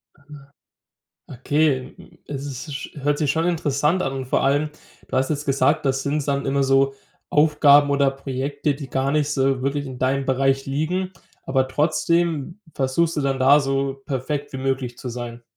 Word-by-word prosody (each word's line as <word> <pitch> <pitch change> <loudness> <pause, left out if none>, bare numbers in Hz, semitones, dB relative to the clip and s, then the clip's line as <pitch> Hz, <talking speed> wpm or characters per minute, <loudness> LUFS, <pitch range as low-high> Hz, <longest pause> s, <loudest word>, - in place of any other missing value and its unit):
Aha. 140 -1 -26 1.0
Okay, 135 +1 0 0.3
äh, - - -8
es 140 +1 -6
sch 140 - -6
hört 145 0 +1
sich 150 -3 +1
schon 165 +3 +1
interessant 160 +1 +1
an. 135 - -2
Und 130 -1 -4
vor - - +1
allem, 145 +2 +2 0.4
du - - -2
hast 130 +3 +1
jetzt 150 0 -2
gesagt, 140 +2 +2
das 135 0 +1
sind 145 0 -1
dann 140 -1 -1
immer 140 0 +1
so 135 0 +3 0.4
Aufgaben 145 -1 +5
oder 140 -1 +3
Projekte, 135 +2 -2
die 140 -2 -8
gar 135 +1 0
nicht 150 0 +1
so 135 -2 +1
wirklich 140 +1 -1
in 130 -2 -8
deinem 135 +1 0
Bereich 135 +1 +1
liegen, 180 +7 -2 0.3
aber 130 -1 +1
trotzdem 170 +3 0
versuchst 155 +5 0
du - - +1
dann 135 -1 0
da 135 +3 +6
so 135 0 -1
perfekt 145 +1 -3
wie 135 - -5
möglich 130 -2 -2
zu 130 - -6
sein. 120 0 -6
140 Hz, 175 wpm, -22 LUFS, 135-150 Hz, 1.0 s, da